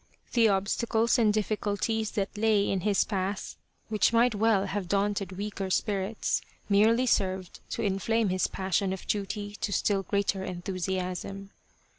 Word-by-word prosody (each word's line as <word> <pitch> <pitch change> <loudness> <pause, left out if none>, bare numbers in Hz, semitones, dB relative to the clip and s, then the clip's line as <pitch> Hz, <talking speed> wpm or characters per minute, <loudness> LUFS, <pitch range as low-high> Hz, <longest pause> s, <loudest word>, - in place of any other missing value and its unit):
The 230 -2 +5
obstacles 225 +4 +1
and 220 -3 +4
difficulties 215 +1 -1
that 200 0 -2
lay 210 -1 +2
in 195 - 0
his 205 +1 +3
path, 195 -1 -3 0.3
which 215 0 +2
might 235 +1 +4
well 210 -2 +2
have 195 -1 -3
daunted 200 0 0
weaker 200 0 -4
spirits, 200 +2 0 0.3
merely 220 +5 +4
served 190 -5 0
to 230 - -3
inflame 210 +2 +1
his 185 0 +1
passion 190 0 -1
of 190 - -7
duty 205 0 -3
to 205 - -1
still 200 0 +1
greater 195 0 -1
en 180 -2 -6
thusiasm. 190 +1 -3
200 Hz, 145 wpm, -28 LUFS, 190-215 Hz, 0.3 s, The